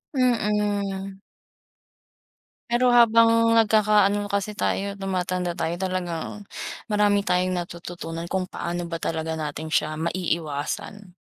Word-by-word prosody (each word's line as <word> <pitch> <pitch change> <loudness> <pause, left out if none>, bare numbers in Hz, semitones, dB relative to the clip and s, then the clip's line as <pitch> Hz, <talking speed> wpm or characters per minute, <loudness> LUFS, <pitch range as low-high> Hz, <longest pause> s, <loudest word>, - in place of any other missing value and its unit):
Mm. 205 -5 0 1.5
Pero 240 +2 +3
habang 230 -1 +6
nagkaka 215 -2 +4
ano 205 0 -2
kasi 200 +1 -1
tayo, 200 0 -1
tumatanda 185 -2 -2
tayo, 170 0 -2
talagang, 185 +1 -4 0.4
marami 210 -2 +3
tayong 180 +1 +2
natututunan 170 -1 -6
kung 185 -1 -1
paano 175 -1 -4
ba 170 - -4
talaga 160 0 -2
natin 155 0 -4
siya 155 0 0
maiiwasan. 170 +3 -3
190 Hz, 105 wpm, -24 LUFS, 170-210 Hz, 1.5 s, habang